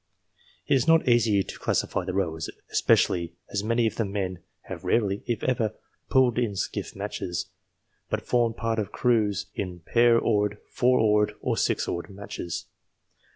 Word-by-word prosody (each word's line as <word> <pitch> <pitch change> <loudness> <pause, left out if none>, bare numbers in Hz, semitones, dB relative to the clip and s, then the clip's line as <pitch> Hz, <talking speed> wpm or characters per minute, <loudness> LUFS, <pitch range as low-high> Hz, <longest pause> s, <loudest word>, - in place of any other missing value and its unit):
It - - +1
is 130 0 +2
not 165 -3 +5
easy 115 -5 +4
to - - -9
classify - - 0
the 95 - -3
rowers, 80 -5 -1 0.2
especially 85 -1 +2 0.2
as 100 0 -1
many 115 +2 +2
of 110 - -1
the 115 - +1
men 95 -3 -3 0.2
have - - -8
rarely, 100 -3 +1
if 120 - -2
ever, 115 -4 0 0.3
pulled 130 -3 +4
in 115 -5 -1
skiff - - -3
matches, 85 -2 -4 0.6
but - - -2
formed 120 -2 +1
part 115 -1 -1
of 105 - -3
crews 110 -5 +1
in 90 -3 -5
pair 120 +6 +4
oared, 105 -2 +1
four 125 +1 +3
oared, 105 -1 +3
or - - 0
six - - 0
oared 85 +4 -3
matches. 100 -3 -6
105 Hz, 160 wpm, -26 LUFS, 95-120 Hz, 0.6 s, not